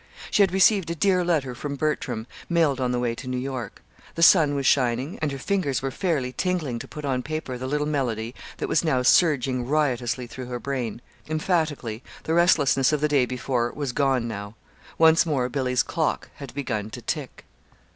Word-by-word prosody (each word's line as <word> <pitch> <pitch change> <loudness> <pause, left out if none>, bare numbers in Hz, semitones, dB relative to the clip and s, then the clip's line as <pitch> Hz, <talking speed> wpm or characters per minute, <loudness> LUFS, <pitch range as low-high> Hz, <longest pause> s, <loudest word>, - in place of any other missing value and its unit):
She - - +4
had 195 -3 +4
received 190 -1 +4
a 170 - -2
dear 185 +2 +2
letter 155 -7 0
from 140 +3 -5
Bertram 130 -6 -2 0.2
(mailed 160 -6 +2
on 125 -1 +1
the 125 - 0
way 120 -1 0
to 130 +3 -9
New 125 0 -2
York), 130 -2 -5 0.3
the 165 - +1
sun 160 -5 +6
was 140 -1 -2
shining, 130 +3 +1
and 155 -2 0
her 135 - -4
fingers 140 - -1
were 135 - -1
fairly 145 -7 -1
tingling 155 -7 -1
to - - -8
put 150 -1 -7
on 130 -2 0
paper 155 -2 -4
the 130 +1 -5
little 150 +2 0
melody 120 -6 -2 0.2
that - - -3
was 160 - +2
now 135 -6 +1
surging 130 -4 +3
riotously 130 -4 0
through 125 +1 -8
her 125 -1 -4
brain. 120 -4 -3 0.3
Emphatically, 155 - -1 0.2
the 160 - -1
restlessness 155 -6 +4
of 150 - +1
the 150 - +2
day 140 -4 +2
before 125 -1 -1
was 145 -3 -2
gone 130 -3 +1
now. 100 -1 -6 0.4
Once 160 0 +6
more 135 -7 0
Billy's 130 -1 +1
"clock" 160 -2 -2
had 140 -4 -8
"begun 110 -7 -3
to - - -8
tick." - - -5
135 Hz, 195 wpm, -25 LUFS, 125-155 Hz, 0.4 s, sun